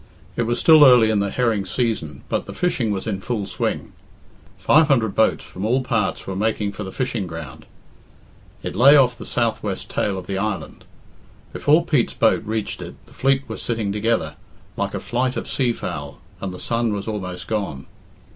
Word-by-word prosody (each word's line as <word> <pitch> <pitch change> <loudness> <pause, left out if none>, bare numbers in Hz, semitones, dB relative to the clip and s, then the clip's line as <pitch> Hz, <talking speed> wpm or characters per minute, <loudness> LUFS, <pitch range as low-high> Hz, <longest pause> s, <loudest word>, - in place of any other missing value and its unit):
It 120 - -1
was 120 +1 0
still 160 -2 +7
early 125 -5 +7
in 105 - +2
the 100 0 0
herring 115 -3 0
season, 95 - -2
but - - -2
the - - -8
fishing 155 -11 0
was 95 -2 -3
in 100 -4 -3
full 110 -3 -2
swing. - - -3 0.6
Five 155 +1 +4
hundred 115 -8 +2
boats 110 - +2
from 95 - -8
all 125 +5 +1
parts 115 -6 -1
were 95 - -4
making 105 0 0
for 105 - -6
the 95 - -6
fishing 120 -6 -2
round. 80 0 -9 1.0
It - - -4
lay 135 +7 +7
off 125 -3 +4
the - - -10
south - - 0
west - - -4
tail 100 -2 -1
of 90 - -6
the 95 0 -3
island. 105 -1 -4 0.7
Before 155 +3 +3
Pete's 145 -8 +1
boat 115 - +3
reached 110 -1 -3
it - - -8
the - - -19
fleet 135 0 +1
were - - -6
sitting 110 -4 -2
together, 110 +3 -1 0.4
like - - -2
a - - -2
flight 125 +1 -1
of - - -4
sea 125 -3 +1
fowl, 75 -10 -6 0.2
and 95 - -3
the 90 - -8
sun 115 +2 -1
was 100 0 -4
almost 95 -4 -4
gone. 100 -11 -3
110 Hz, 195 wpm, -22 LUFS, 100-125 Hz, 1.0 s, still